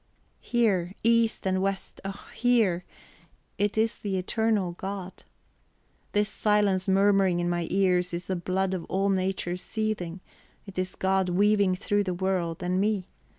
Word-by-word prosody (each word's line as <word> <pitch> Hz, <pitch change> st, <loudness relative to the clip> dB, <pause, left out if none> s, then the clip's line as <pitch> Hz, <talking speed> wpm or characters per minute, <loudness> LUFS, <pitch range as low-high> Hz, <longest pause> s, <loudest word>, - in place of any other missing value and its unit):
Hear, 195 Hz, -7 st, +1 dB
east 230 Hz, -1 st, +2 dB
and 185 Hz, 0 st, +1 dB
west, 195 Hz, 0 st, -3 dB
oh, 195 Hz, 0 st, -7 dB
hear. 220 Hz, -8 st, +2 dB, 0.7 s
It 205 Hz, +1 st, 0 dB
is 220 Hz, 0 st, +1 dB
the 195 Hz, -2 st, -2 dB
eternal 205 Hz, 0 st, 0 dB
God. 190 Hz, +1 st, -7 dB, 0.9 s
This 210 Hz, 0 st, +2 dB
silence 205 Hz, -3 st, +1 dB
murmuring 195 Hz, -2 st, +3 dB
in 175 Hz, -, 0 dB
my 175 Hz, -1 st, -1 dB
ears 180 Hz, -1 st, +2 dB
is 170 Hz, +1 st, -4 dB
the 190 Hz, -, -2 dB
blood 185 Hz, +2 st, -1 dB
of 180 Hz, -3 st, -3 dB
all 195 Hz, +1 st, 0 dB
Nature 185 Hz, -2 st, -1 dB
seething; 195 Hz, -4 st, -3 dB, 0.5 s
it 195 Hz, -2 st, -6 dB
is 185 Hz, 0 st, -2 dB
God 190 Hz, -1 st, +1 dB
weaving 200 Hz, 0 st, +3 dB
through 205 Hz, +2 st, 0 dB
the 185 Hz, -2 st, -2 dB
world 180 Hz, -2 st, -1 dB
and 180 Hz, +1 st, +1 dB
me. 205 Hz, -3 st, 0 dB
190 Hz, 150 wpm, -27 LUFS, 180-205 Hz, 0.9 s, murmuring